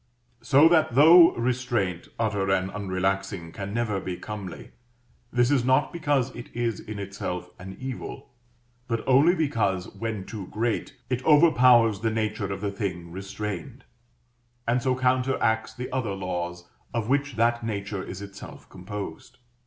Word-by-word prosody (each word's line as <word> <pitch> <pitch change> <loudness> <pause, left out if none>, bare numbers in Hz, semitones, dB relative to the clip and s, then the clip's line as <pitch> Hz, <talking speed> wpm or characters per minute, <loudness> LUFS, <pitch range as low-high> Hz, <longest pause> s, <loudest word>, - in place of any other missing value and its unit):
So 140 +4 +6
that 160 -8 +3
though 165 +4 +8
restraint, 120 -7 -1
utter 105 -4 0
and 95 0 +1
unrelaxing, 95 -2 -2
can 100 0 -5
never 110 -3 -1
be 90 -1 -5
comely, 100 -1 -7 0.6
this 120 +2 +2
is 135 -4 +3
not 130 +2 +2
because 145 -6 0
it 120 - -9
is 120 -2 -1
in 105 -1 -7
itself 95 -3 -5
an 95 +1 -9
evil, 130 -1 -7 0.6
but 115 -3 -2
only 140 +7 +5
because, 110 - 0
when 105 -1 -4
too 100 -4 -7
great, 115 +1 -2 0.2
it 125 0 -1
overpowers 125 - +5
the 115 +2 0
nature 110 -2 -2
of 100 0 -4
the 100 -1 -1
thing 90 -4 -4
restrained, 105 +6 -6 0.8
and 120 +2 +2
so 130 +1 +1
counteracts 125 -3 +1
the 125 0 -6
other 120 -6 -2
laws 90 -2 -4 0.3
of 115 -2 -1
which 140 0 0
that 120 +1 +2
nature 100 -3 -3
is 95 +1 -7
itself 100 0 -11
composed. 95 -2 -7
110 Hz, 145 wpm, -26 LUFS, 95-125 Hz, 0.8 s, though